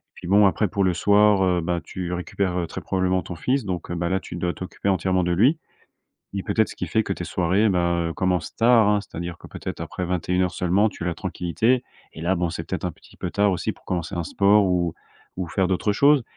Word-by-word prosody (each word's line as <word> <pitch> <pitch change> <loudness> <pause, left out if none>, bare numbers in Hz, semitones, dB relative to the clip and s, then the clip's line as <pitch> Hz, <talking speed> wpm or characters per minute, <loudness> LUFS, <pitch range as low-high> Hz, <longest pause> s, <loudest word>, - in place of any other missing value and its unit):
Puis, 90 - -9
bon, 100 +2 +6
après, 105 +2 +1
pour 100 +2 -1
le 95 -2 +2
soir, 100 +2 +4
heu, 90 -1 +2
bah, 85 +1 -1
tu 90 -2 -5
récupères, 90 +1 -2
heu, 85 -2 -1
très - - -7
probablement 95 -1 0
ton 85 - -7
fils. 130 +10 0
Donc, 90 -2 -4
heu, - - -2
bah 85 0 -1
là, 95 - +1
tu - - -9
dois 85 0 -1
t'occuper 95 +2 -4
entièrement 95 0 +1
de 85 - 0
lui 130 - +3 0.8
et 100 - -2
peut-être 110 +2 +1
ce - - -9
qui - - -3
fait 110 - +1
que 100 - -2
tes 90 - -5
soirées, 95 +5 +1
ben, 85 -2 +1
heu, 80 - -3
commencent 90 -2 -1
tard, 115 -2 +5
hein. 105 0 +3
C'est-à-dire 85 -2 -6
que - - -12
peut-être - - -7
après 90 - -4
21:00 90 +1 0
seulement, 95 +6 +2
tu 95 - -7
as - - -2
la 85 - -1
tranquillité 95 +9 0 0.3
et 80 - -10
là, 90 +3 +2
bon, 85 -1 -1
c'est 85 - -5
peut-être - - -3
un - - 0
petit - - -20
peu - - -4
tard 100 0 +2
aussi 90 - -2
pour - - -24
commencer 90 0 -3
un 85 -1 -2
sport, 100 +4 +4
ou 90 -2 0 0.4
ou 90 -1 -3
faire 95 +2 0
d'autres 95 +3 +1
choses. 140 +5 +4
95 Hz, 245 wpm, -23 LUFS, 85-100 Hz, 0.8 s, bon